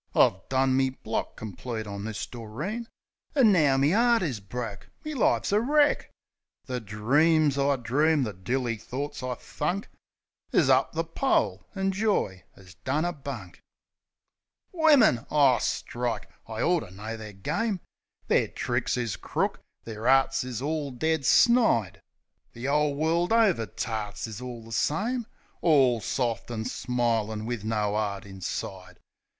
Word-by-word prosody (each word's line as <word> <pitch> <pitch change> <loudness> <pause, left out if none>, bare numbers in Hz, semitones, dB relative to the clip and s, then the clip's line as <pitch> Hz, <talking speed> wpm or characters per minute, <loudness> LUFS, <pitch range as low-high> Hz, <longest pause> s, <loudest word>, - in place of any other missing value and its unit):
I - - +5
done 130 0 +2
me 130 0 +3
block 115 -4 -4
complete 110 +2 -6
on 100 0 -6
this 110 -2 -4
Doreen, 150 - -5 0.5
An' 250 -7 +6
now 150 -8 +4
me 140 +5 +3
'eart 235 0 +4
is 135 -10 -2
broke, 105 0 -6 0.2
me 305 - -3
life's 260 - +1
wreck! 290 +8 +3 0.6
The 125 -1 -3
dreams 140 +8 +2
I 140 0 +2
dreamed, 140 +4 +2
the 105 - -4
dilly 115 +5 -2
thorts 135 +7 -5
I 125 -1 -3
thunk 175 - -3 0.6
Is - - +4
up - - +3
the - - 0
pole, - - 0
an' 195 0 0
joy 190 - 0
'as 95 -2 -15
done 150 +5 0
a 175 - -1
bunk. 130 - -8 1.1
Wimmin! 285 - +4
O 140 -5 +4
strike! 120 -2 -2 0.2
I 110 0 -4
orter 175 - +1
known 110 +4 -7
the 105 -1 -8
game! 195 - -2 0.5
Their - - +2
tricks - - -1
is 120 -5 -2
crook, - - -2 0.2
their 110 +1 -5
arts 135 0 +4
is 125 -1 -5
all 150 -1 -1
dead 150 +1 -1
snide. 225 - +4 0.5
The 120 +3 -5
'ole 150 0 +2
world 165 +5 +1
over 205 - +3
tarts 105 +1 -4
is 110 0 -7
all 120 -2 -7
the 115 - -13
same; 220 - 0 0.3
All 135 -8 +4
soft 120 -1 -2
an' 110 -2 -4
smilin' 115 -4 -1
wiv 120 -3 -3
no 105 -2 0
'eart 105 -2 -2
inside. 95 -1 -6
130 Hz, 145 wpm, -27 LUFS, 110-160 Hz, 1.1 s, An